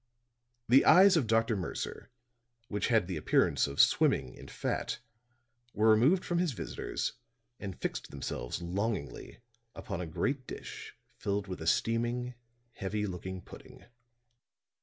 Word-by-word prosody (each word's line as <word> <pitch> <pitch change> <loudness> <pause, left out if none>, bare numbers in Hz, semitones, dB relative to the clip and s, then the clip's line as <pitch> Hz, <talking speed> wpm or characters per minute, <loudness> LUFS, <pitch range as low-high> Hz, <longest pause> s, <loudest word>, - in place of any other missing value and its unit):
The 130 +3 +6
eyes 185 +3 +7
of 145 -8 +2
Dr. 115 0 +2
Mercer, 90 -4 -5 0.6
which 105 - -1
had 115 -6 +3
the 90 -2 -4
appearance 75 - +2
of 70 0 -7
swimming 65 -2 +4
in - - -12
fat, - - -2 0.8
were 110 +1 +5
removed 135 - +4
from 175 -1 0
his 175 -5 +1
visitors, - - -3 0.5
and 95 -3 -6
fixed - - -3
themselves 70 +2 -5
longingly 90 - -3 0.3
upon 90 - -5
a 90 - -4
great 130 - -2
dish - - -8 0.2
filled 100 0 -1
with 90 -3 -6
a 80 - -4
steaming, 120 +5 +1 0.4
heavy 105 -1 -3
looking 95 0 -6
pudding. - - -13
105 Hz, 135 wpm, -31 LUFS, 90-120 Hz, 0.8 s, eyes